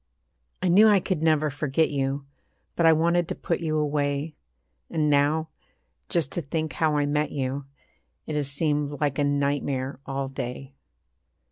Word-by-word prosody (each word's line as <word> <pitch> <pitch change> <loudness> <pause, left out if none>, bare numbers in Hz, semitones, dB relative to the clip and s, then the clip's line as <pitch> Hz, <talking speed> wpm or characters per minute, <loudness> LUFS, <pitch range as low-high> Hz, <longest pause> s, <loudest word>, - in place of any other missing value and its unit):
I - - +2
knew 200 +5 +7
I 205 -2 +6
could 180 -3 -2
never 155 -2 +2
forget 150 +2 0
you; 140 0 -1 0.5
But 170 - +3
I - - +8
wanted 170 +2 +2
to - - -3
put 170 - -2
you 155 -2 -1
away. 145 0 -1 0.6
And 155 -3 +1
now, 150 +3 +2 0.6
just 165 -5 0
to 175 - -2
think 155 0 -3
how 155 -2 +1
I 145 - +2
met 150 +1 0
you 135 0 -3 0.6
It 155 - -4
has 145 -2 -1
seemed 145 -1 0
like 145 -2 0
a - - +3
nightmare 140 -2 -1
all 135 0 -2
day. 135 +1 -6
150 Hz, 160 wpm, -26 LUFS, 140-160 Hz, 0.6 s, I